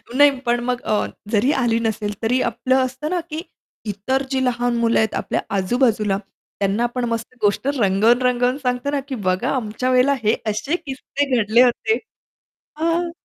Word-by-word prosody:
नाही, 285 -1 +5
पण 240 0 +2
मग 250 0 -1
अ, 215 -5 0 0.3
जरी 230 +5 +3
आली 230 -2 +2
नसेल, 220 -2 -2
तरी 245 +3 +1
आपलं 255 +3 0
असतं 260 +4 -5
ना, 360 +1 0
की 310 +1 -4 0.4
इतर 215 +7 -1
जी 265 -1 +1
लहान 245 -1 0
मुलं 230 0 +2
आहेत 220 -1 +1
आपल्या - - -1
आजूबाजूला, 210 0 +1 0.4
त्यांना 200 +3 +1
आपण 240 +1 -1
मस्त 230 +2 -5
गोष्ट 205 +5 +1
रंगवून-रंगवून 240 +5 +3
सांगतो 250 -1 -2
ना 290 - 0
की 270 - -4
बघा 185 0 +1
आमच्या 250 +1 -2
वेळेला 255 +2 +4
हे 215 +2 +3
असे 245 +10 -1
किस्से 280 -3 -2
घडले 220 +4 +5
होते. 255 - +2 0.8
हां. 335 +2 0
245 Hz, 165 wpm, -21 LUFS, 220-265 Hz, 0.8 s, नाही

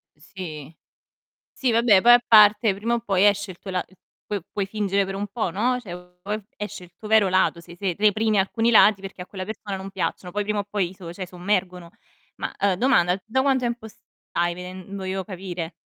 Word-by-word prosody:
Sì. 155 -6 -9 0.8
Sì, 260 - 0
vabbè 225 -4 +5
poi 240 - +8
a 240 - +8
parte, 210 -1 +6
prima 225 +5 -1
o 235 - -1
poi 195 -3 +1
esce 205 -1 +2
il 175 - -19
tuo 195 - -8
la 185 -1 -1
es 190 - -24 0.3
puo 205 -1 -3
puoi 200 -2 -2
fingere 200 -1 0
per 195 - -5
un 200 +1 -3
po', 205 -2 -2
no, 240 +8 0
cioè 180 -7 -8 0.2
poi 210 +3 -4
esce 210 -3 -6
il 175 - -17
tuo 215 - -9
vero 215 -2 +5
lato, 185 -2 +2
se 170 0 -14
se 190 -2 -1
reprimi 215 +1 +2
alcuni 225 +4 +1
lati 210 -3 +6
perché 195 -1 -8
a - - -11
quella 185 -1 -6
persona 205 -1 -6
non 190 +1 -7
piacciono, 180 -2 -3
poi 205 - -1
prima 210 0 -1
o 205 - -1
poi 200 -4 -1
i - - -13
so 175 -3 -9
cioè 185 +1 -6
sommergono. 180 -1 -2 0.5
Ma, - - -5
ehm, 200 -2 +2
domanda 180 -6 +3
tu 190 - -18
da 250 +4 +1
quanto 265 -2 +2
tempo 235 -2 -3
stai? 175 -4 -4
veden 185 +2 -9
voglio 190 0 -3
capire. 180 -3 -6
195 Hz, 220 wpm, -24 LUFS, 185-215 Hz, 0.8 s, poi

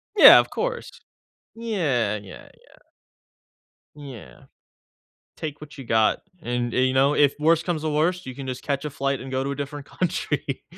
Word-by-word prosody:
Yeah, 410 - +10
of - - 0
course. - - -3 0.7
Yeah, 160 - -1
yeah, 100 -3 -11
yeah. - - -23 1.2
Yeah. 140 -7 -11 0.9
Take 150 -2 -6
what 150 -1 -12
you 135 - -8
got, 110 -2 +1 0.2
and, 120 0 -2
uh - - -1
you 130 0 +2
know, 135 +2 +3
if 145 -2 +3
worse 165 +2 +3
comes 165 -3 -3
to 155 - 0
worst, 165 +4 0
you 130 - -6
can 135 +1 -8
just 130 0 -5
catch 140 0 -2
a - - -2
flight 135 -1 -2
and 130 - -8
go 130 0 -1
to 140 - -3
a - - -3
different 145 0 -6
country. 155 -6 -3
140 Hz, 180 wpm, -24 LUFS, 130-155 Hz, 1.2 s, Yeah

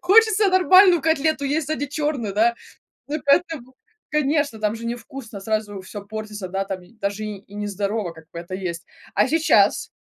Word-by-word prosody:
хочется 420 +2 +5
нормальную 370 -2 +6
котлету 315 -2 +1
есть, 295 +2 -1
а - - +2
не 290 - -3
чёрную, 290 -9 -2
да? 235 +3 +3 0.5
Ну 295 - -1
и 310 - -7
к 280 - -18
этому 280 -5 +2 0.4
конечно, 290 -4 +1
там 210 0 0
же 230 - -9
не 235 - -1
вкусно, 230 -4 -9
сразу 210 -1 -2
всё 200 +1 -8
портится, 215 -2 -6
да, 195 +1 -2
там 190 -2 -5
и 180 - -19
даже, 205 -1 -3
и, 210 -2 -5
и 200 0 -18
не 210 0 -3
здорово, 200 -2 -2
как 160 -1 -15
бы, - - -7
это 175 +2 -7
есть. 170 -3 -4 0.3
А 205 - +4
сейчас, 320 +1 +3
230 Hz, 205 wpm, -22 LUFS, 200-305 Hz, 0.5 s, нормальную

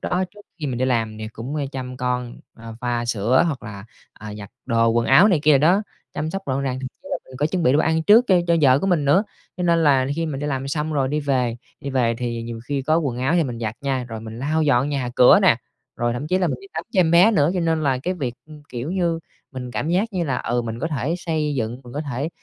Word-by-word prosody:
đó, 185 +1 0
trước 210 - -14 0.2
khi 150 - -2
mình 125 -3 -3
đi 130 - +1
làm 115 -4 -1
thì 110 - -5
cũng, 120 +7 -6
a, 145 - -1
chăm 130 -1 -6
con, 125 -1 -2 0.2
ờ, 115 0 -10
pha 120 -1 -1
sữa 120 +3 +2
hoặc 145 -6 -3
là, 100 -2 -8 0.3
à, 105 -1 -9
giặt 100 -1 -9 0.2
đồ 115 -2 +3
quần 115 0 +1
áo 180 +10 +7
này 185 -6 +3
kia 150 -2 +5
đồ 150 +4 +4
đó, 195 +4 +3 0.3
chăm 155 +1 -2
sóc 195 +2 -4
gọn 135 0 -1
gàng, 130 -1 -2
thậm 130 - -4 0.2
chí - - -12
là - - 0
mình 130 - -12
có 145 - +1
chuẩn 175 +2 -2
bị 125 - +4
đồ 145 - +3
ăn 160 +1 +2
trước 220 +8 +6
cho 190 - +5
cho 170 -1 +3
vợ 135 -3 +5
của 195 - -2
mình 170 -6 +2
nữa. 170 +10 +4 0.3
Cho 180 - -3
nên 170 -1 +3
là 135 -3 +4
khi 165 0 -1
mình 140 -3 -4
đi 145 - -2
làm 135 -1 -2
xong 155 +2 -2
rồi 135 -3 +1
đi 150 +2 -1
về 125 -5 0 0.2
đi 140 - -5
về 120 -3 +1
thì 120 -2 -3
nhiều 115 -1 -6
khi 140 0 -2
có 155 +4 +2
quần 130 -6 -2
áo 135 +6 +1
thì 170 -2 +3
mình 120 -4 -5
giặt 110 -1 -3
nha, 135 -3 -1
rồi 110 -1 -6
mình 110 +1 -8
lau 155 +5 0
dọn 135 -2 +2
nhà 135 -4 -2
cửa 125 - +7
nè, - - +5 0.4
rồi 120 0 0
thậm 120 +5 -4
chí 185 +4 +1
là 185 - +1
mình - - -3
đi 395 - -13
tắm - - -3
cho 190 - +4
em 165 -3 +3
bé 175 +6 +6
nữa. 155 -6 +3
Cho 180 - 0
nên 165 -2 0
là 135 -3 +1
cái 180 +8 -2
việc, 130 -9 -3
ưm, 150 -1 -13
kiểu 125 +5 -5
như, 175 -3 0 0.3
mình 125 -1 -6
cảm 145 - -3
giác 200 +6 0
như 175 -2 -1
là, 135 -4 -1
ừ, 120 +1 -1
mình 115 0 -5
có 155 - -2
thể 150 +1 -2
xây 155 -4 -1
dựng, 120 0 -3
mình 120 - -11
có 145 - -3
thể 140 0 -3
135 Hz, 290 wpm, -22 LUFS, 120-160 Hz, 0.4 s, áo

